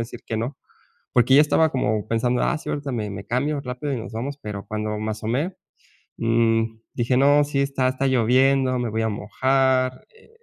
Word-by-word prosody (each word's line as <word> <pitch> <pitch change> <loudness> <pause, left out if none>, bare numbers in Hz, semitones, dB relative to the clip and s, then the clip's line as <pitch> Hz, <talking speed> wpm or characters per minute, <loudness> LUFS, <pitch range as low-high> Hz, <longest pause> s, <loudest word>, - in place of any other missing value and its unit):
decir 115 +1 -6
que 110 - -3
no. 120 +6 -3 0.6
Porque 125 +2 +4
yo 140 - +8
estaba 160 +1 +3
como 110 -5 -1
pensando. 120 +2 +1
Ah, 165 - +1
sí, - - -10
ahorita 145 -2 -3
me 110 -4 -2
me 95 0 -7
cambio 140 +4 -1
rápido 125 +2 -4
y - - -1
nos 110 - -8
vamos. 130 +6 -4
Pero 100 -2 -6
cuando 105 0 -3
me 110 +1 -3
asomé, 125 - -2 0.6
mm, 115 0 +2 0.3
dije: 125 +1 +1
"No, 145 +2 +5
si 145 -1 -2
está 135 -2 +1
está 130 +1 -1
lloviendo. 130 +1 +3
Me 120 -1 -1
voy 110 +1 -2
a 110 - 0
mojar, 130 +4 0
eh, 455 - -22
125 Hz, 195 wpm, -23 LUFS, 115-135 Hz, 0.6 s, yo